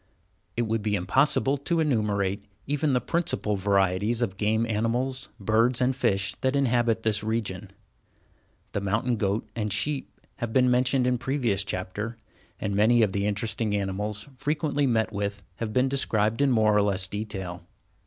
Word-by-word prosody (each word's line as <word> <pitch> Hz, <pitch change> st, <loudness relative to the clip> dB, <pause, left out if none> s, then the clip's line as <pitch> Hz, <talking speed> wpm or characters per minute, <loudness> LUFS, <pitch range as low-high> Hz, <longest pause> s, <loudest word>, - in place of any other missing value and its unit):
It 120 Hz, -, +2 dB
would 115 Hz, -1 st, -1 dB
be 105 Hz, 0 st, 0 dB
impossible 135 Hz, +8 st, +2 dB
to 170 Hz, +4 st, 0 dB
enumerate 105 Hz, -8 st, 0 dB, 0.2 s
even 145 Hz, 0 st, 0 dB
the 125 Hz, -, +3 dB
principal 155 Hz, -10 st, -1 dB
varieties 100 Hz, +3 st, +1 dB
of 95 Hz, -5 st, -2 dB
game 110 Hz, +2 st, +1 dB
animals, 115 Hz, +4 st, -1 dB
birds, 115 Hz, +4 st, +2 dB
and 130 Hz, +1 st, +2 dB
fish 100 Hz, -5 st, +1 dB
that 130 Hz, +1 st, +1 dB
inhabit 120 Hz, -4 st, +2 dB
this 105 Hz, -1 st, +2 dB
region. 105 Hz, -3 st, -3 dB, 1.0 s
The 100 Hz, -, -2 dB
mountain 110 Hz, +5 st, 0 dB
goat 100 Hz, +1 st, -1 dB
and 105 Hz, -2 st, -2 dB
sheep 135 Hz, +7 st, -2 dB, 0.2 s
have 120 Hz, -1 st, -3 dB
been 125 Hz, +1 st, +4 dB
mentioned 125 Hz, +1 st, +2 dB
in 125 Hz, -1 st, +1 dB
previous 120 Hz, -8 st, 0 dB
chapters, 100 Hz, +4 st, -4 dB, 0.4 s
and 100 Hz, -2 st, -2 dB
many 110 Hz, +3 st, +4 dB
of 105 Hz, -, +2 dB
the 100 Hz, 0 st, 0 dB
interesting 105 Hz, +1 st, -1 dB
animals 105 Hz, +3 st, -2 dB
frequently 145 Hz, 0 st, 0 dB
met 110 Hz, -3 st, +1 dB
with 100 Hz, 0 st, -3 dB
have 115 Hz, -2 st, -3 dB
been 125 Hz, +4 st, +2 dB
described 115 Hz, -3 st, +1 dB
in 140 Hz, -, +4 dB
more 110 Hz, -4 st, +3 dB
or 105 Hz, -, +5 dB
less 100 Hz, -2 st, +1 dB
detail. 95 Hz, -4 st, -5 dB
110 Hz, 160 wpm, -26 LUFS, 100-125 Hz, 1.0 s, or